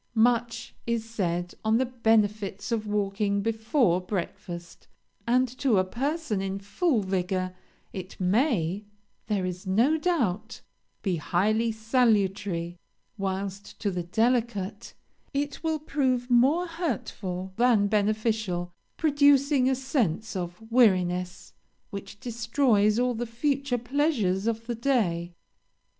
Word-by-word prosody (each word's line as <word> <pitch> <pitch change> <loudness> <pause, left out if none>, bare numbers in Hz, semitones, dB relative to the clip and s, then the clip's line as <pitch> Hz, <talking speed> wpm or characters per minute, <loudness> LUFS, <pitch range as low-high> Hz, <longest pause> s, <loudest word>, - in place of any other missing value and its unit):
"Much 235 0 +1
is 230 -1 -1
said 175 -5 -2
on 220 +1 +3
the 260 - +2
benefits 215 -4 0
of 220 -2 -1
walking 200 0 0
before 220 - +2
breakfast, 175 -2 -6 0.4
and 255 +2 +3
to 255 -2 +1
a 185 - +4
person 260 - -2
in 195 0 -2
full 220 - 0
vigor 185 -1 -1 0.4
it 185 0 -7
may, 195 - +1 0.4
there 205 -4 0
is 180 +1 -5
no 235 +12 +3
doubt, 225 - -1 0.4
be 185 -4 0
highly 215 +8 +1
salutary; 205 -7 +1 0.4
whilst, 195 +1 -4
to 205 - -1
the 180 -1 -2
delicate, 220 +1 -1 0.4
it 285 +2 -2
will 320 -1 +1
prove 260 -5 -1
more 275 +9 +4
hurtful 200 - -4
than 235 -4 +4
beneficial, 210 -4 0 0.2
producing 285 -3 +4
a 265 - +2
sense 225 - -1
of 175 0 -4
weariness 180 -6 +2 0.4
which 200 0 -8
destroys 225 -2 +2
all 250 0 +2
the 240 +1 -3
future 275 +2 0
pleasures 240 - 0
of 230 0 -1
the 240 - -2
day. 195 -9 0
220 Hz, 120 wpm, -27 LUFS, 190-250 Hz, 0.4 s, a